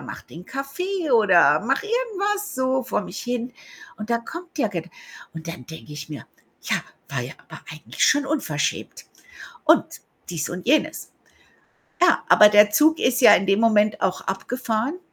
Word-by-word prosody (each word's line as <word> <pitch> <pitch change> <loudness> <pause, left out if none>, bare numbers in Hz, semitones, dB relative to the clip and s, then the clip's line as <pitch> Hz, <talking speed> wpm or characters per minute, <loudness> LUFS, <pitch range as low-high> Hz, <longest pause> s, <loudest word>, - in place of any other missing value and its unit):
mache - - -10
den 170 +3 -12
Kaffee 305 - -4
oder 180 -9 +5
mache 270 - -1
irgendwas 415 -3 -2
so 260 0 0
vor - - -2
mich 195 -1 -8
hin. 245 0 -4 0.4
Und 215 +2 -8
da 235 - +2
kommt 340 +7 -10
der 225 - +1
Ged 175 -3 -6 0.4
und 160 0 -9
dann 165 -6 -7
denke 160 -1 -11
ich 150 +1 -8
mir: 145 - -8 0.4
„Ja, - - 0 0.3
war - - -3
ja - - -7 0.2
aber - - -11
eigentlich 155 - -2
schon 285 -2 +3
unverschämt 220 - -3 0.6
und - - +5 0.4
dies 165 -4 -4
und 180 +4 -7
jenes.“ 300 +4 0 0.9
Ja, 350 - +4
aber 210 0 +7
der 210 0 +6
Zug 315 +8 +3
ist 250 0 +1
ja - - +9
in 195 - +1
dem 195 +2 +2
Moment 215 -2 +2
auch 185 -1 0
abgefahren 230 - -3
230 Hz, 165 wpm, -22 LUFS, 185-290 Hz, 0.9 s, ja